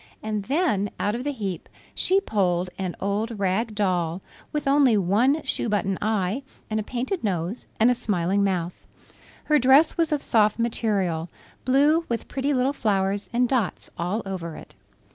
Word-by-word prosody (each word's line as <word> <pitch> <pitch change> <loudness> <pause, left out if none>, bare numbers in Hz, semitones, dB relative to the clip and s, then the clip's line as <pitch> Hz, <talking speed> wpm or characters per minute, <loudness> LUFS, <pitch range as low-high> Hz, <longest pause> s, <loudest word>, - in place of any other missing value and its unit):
And 215 -2 -3
then 265 - +1
out 205 - 0
of 240 +2 -3
the 290 - -1
heap 200 - -5 0.2
she 380 +2 +3
pulled 185 - 0
an 185 -2 -3
old 210 +3 -2
rag 205 +3 0
doll 180 -3 0 0.3
with 300 -1 -2
only 275 -5 +5
one 230 - +2
shoe 235 - -2
button 195 -2 0
eye 210 +2 0 0.3
and 215 - 0
a - - -2
painted 255 - -3
nose 185 +1 -2
and 230 +3 +5
a - - +4
smiling 200 -5 0
mouth. 180 -3 0 0.7
Her 300 -1 +3
dress 270 +5 +5
was 330 -2 +1
of 295 -2 0
soft 215 -3 +3
material, 200 -8 0 0.4
blue 290 +6 +4
with 235 -1 -2
pretty 275 +1 -1
little 265 0 +1
flowers 200 -4 0
and 245 +1 +2
dots 240 -7 -1
all 185 +6 -2
over 175 -4 -5
it. - - -12
215 Hz, 165 wpm, -24 LUFS, 190-255 Hz, 0.7 s, only